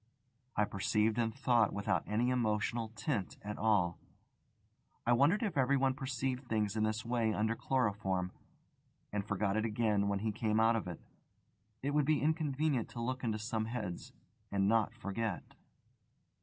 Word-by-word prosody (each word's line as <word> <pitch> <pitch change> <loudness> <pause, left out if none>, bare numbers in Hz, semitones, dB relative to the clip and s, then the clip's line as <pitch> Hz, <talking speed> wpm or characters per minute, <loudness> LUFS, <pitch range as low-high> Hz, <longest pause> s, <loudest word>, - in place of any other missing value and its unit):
I 105 - +3
perceived 105 +3 +1
and 115 -1 +1
thought 120 -3 +2
without 100 - 0
any 120 +4 +1
emotional 115 -1 0
tint 110 - -2
at 105 +1 -5
all. 100 -6 +2 1.1
I 120 - +4
wondered 155 - +4
if 195 -10 0
everyone 135 0 +3
perceived 130 -1 -3
things 110 -3 0
in 110 - 0
this 110 +1 0
way 115 -2 +1
under 110 +2 +1
chloroform, 100 -8 0 0.8
and 105 -1 0
forgot 105 0 0
it 110 - +1
again 105 -2 +1
when 100 0 +1
he 110 +2 -1
came 110 0 0
out 115 +1 +5
of 110 - -2
it. 85 -2 -6 0.8
It 140 - 0
would 150 -1 +2
be 155 0 +3
inconvenient 150 -4 0
to 120 - -8
look 130 +2 -2
into 110 -3 0
some 110 0 -2
heads, 110 -7 -5 0.4
and 100 -1 +2
not 115 +1 +2
forget. 110 -3 -4
110 Hz, 155 wpm, -34 LUFS, 105-125 Hz, 1.1 s, out